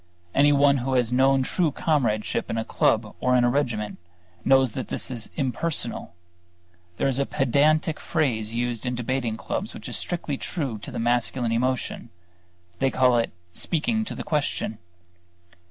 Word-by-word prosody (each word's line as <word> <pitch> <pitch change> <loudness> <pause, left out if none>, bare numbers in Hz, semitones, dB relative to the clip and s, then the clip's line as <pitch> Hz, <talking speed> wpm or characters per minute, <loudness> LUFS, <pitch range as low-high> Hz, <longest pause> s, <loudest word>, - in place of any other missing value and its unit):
Anyone 140 0 +5
who 130 +1 -2
has 125 -1 +1
known 135 +1 +4
true 165 +3 +1
comradeship 125 - 0
in 115 - -2
a 110 - -1
club 110 -1 +1
or 125 0 +2
in 125 - +4
a 120 - +3
regiment, 120 -7 -1 0.4
knows 135 -2 +4
that 125 0 -6
it - - -1
is 115 -3 -4
impersonal. 130 - -1 0.8
There - - +1
is 135 0 +1
a 140 - +2
pedantic 150 +5 +2
phrase 115 -9 0
used 120 0 -2
in 125 - -1
debating 120 -2 -2
clubs - - -4
which - - -8
is - - +1
strictly 155 -5 -3
true 135 - -3
to - - -8
the - - -6
masculine 120 +1 +1
emotion; 125 +2 -1 0.7
they 135 - +3
call 130 -2 +3
it 115 - -1 0.2
"speaking 220 - 0
to - - -5
the - - -5
question." 145 -7 -1
130 Hz, 160 wpm, -25 LUFS, 115-140 Hz, 0.8 s, Anyone